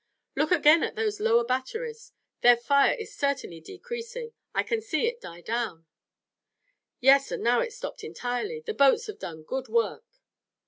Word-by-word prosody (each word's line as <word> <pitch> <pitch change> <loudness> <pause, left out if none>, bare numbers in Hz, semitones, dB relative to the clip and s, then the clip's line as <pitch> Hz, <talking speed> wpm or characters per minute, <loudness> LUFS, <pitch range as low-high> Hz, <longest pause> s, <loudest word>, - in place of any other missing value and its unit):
"Look 305 +3 0
again 320 -1 +6
at - - -2
those 430 -1 -1
lower 460 +2 +3
batteries. 455 - -4 0.3
Their 245 0 +7
fire 280 +4 +3
is 445 -3 -8
certainly 275 - -2
decreasing. 470 - -7 0.2
I - - 0
can 455 -2 -1
see 415 -4 -1
it 475 0 -2
die 170 +1 -10
down." 220 -6 -3 1.1
"Yes, 275 +2 +5
and - - -3
now 240 +1 +3
it's 470 0 -2
stopped - - -7
entirely. 250 - -4
The 450 -1 -4
boats 280 - +4
have 430 -2 -8
done 160 -2 -7
good 260 +10 -4
work!" 465 0 0
385 Hz, 165 wpm, -27 LUFS, -, 1.1 s, Their